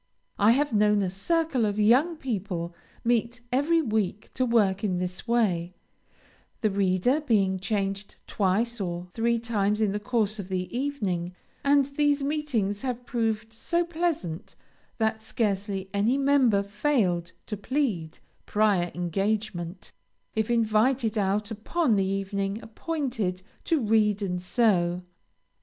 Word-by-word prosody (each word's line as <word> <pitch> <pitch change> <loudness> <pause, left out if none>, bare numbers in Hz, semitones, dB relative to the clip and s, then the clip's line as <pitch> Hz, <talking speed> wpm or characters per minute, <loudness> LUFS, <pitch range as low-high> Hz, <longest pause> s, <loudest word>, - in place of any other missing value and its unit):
I 210 +3 +6
have 285 0 +1
known 210 -1 +3
a 185 - -1
circle 285 - 0
of 205 -1 0
young 250 +11 +4
people 190 - -3 0.3
meet 240 +1 0
every 315 +6 +3
week 215 -4 -2
to 255 - 0
work 205 -4 +2
in 185 -4 0
this 180 +4 -4
way, 185 -7 +1 0.9
the 215 -3 +2
reader 195 - +2
being 200 -9 +2
changed 195 0 -2
twice 220 +4 0
or 175 -1 -3
three 235 +1 +1
times 210 -3 0
in 215 -2 +2
the 205 - -2
course 215 -2 0
of 190 -2 -6
the 185 +3 -3
evening, 200 -11 -2 0.3
and 280 -1 +4
these 285 0 +1
meetings 275 -9 -1
have 250 -2 -3
proved 225 -2 -1
so 340 +9 0
pleasant, 325 - -3 0.4
that 220 -1 0
scarcely 200 -3 -2
any 215 +6 +2
member 270 -7 +3
failed 200 - 0
to 210 - -4
plead 205 - -2 0.3
"prior 205 -5 +2
engagement" 185 0 -2 0.4
if 220 0 -1
invited 230 +1 +2
out 205 +1 0
upon 225 +4 +1
the 195 - +2
evening 195 +1 -2
appointed 225 - -3 0.2
to 325 -3 +2
read 210 -3 +2
and 180 -2 -2
sew. 180 -4 +2
215 Hz, 135 wpm, -27 LUFS, 195-245 Hz, 0.9 s, I